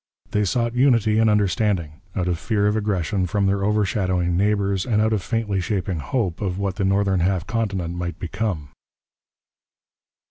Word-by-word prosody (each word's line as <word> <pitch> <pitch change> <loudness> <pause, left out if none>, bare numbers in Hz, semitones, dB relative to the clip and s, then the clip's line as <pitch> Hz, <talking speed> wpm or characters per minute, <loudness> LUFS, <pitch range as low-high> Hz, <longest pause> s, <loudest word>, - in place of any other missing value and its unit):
They 105 0 +1
sought 115 +5 0
unity 115 -4 +3
and 110 -1 +4
understanding, 100 -6 0
out 90 -1 -1
of 85 -2 -1
fear 105 +3 0
of 105 +1 +2
aggression 95 -4 0
from 100 +3 0
their 100 0 +1
overshadowing 95 -4 +1
neighbours 100 -1 +1
and 110 -1 +1
out 110 +1 +2
of 105 - 0
faintly 105 -2 -1
shaping 95 -4 -2
hope 95 - -2
of 95 -3 -2
what 100 -1 -2
the 100 - 0
northern 95 -1 +2
half 90 -1 +1
continent 100 -5 -2
might 85 -1 -4
become. 90 -5 -3
100 Hz, 165 wpm, -22 LUFS, 90-105 Hz, -, and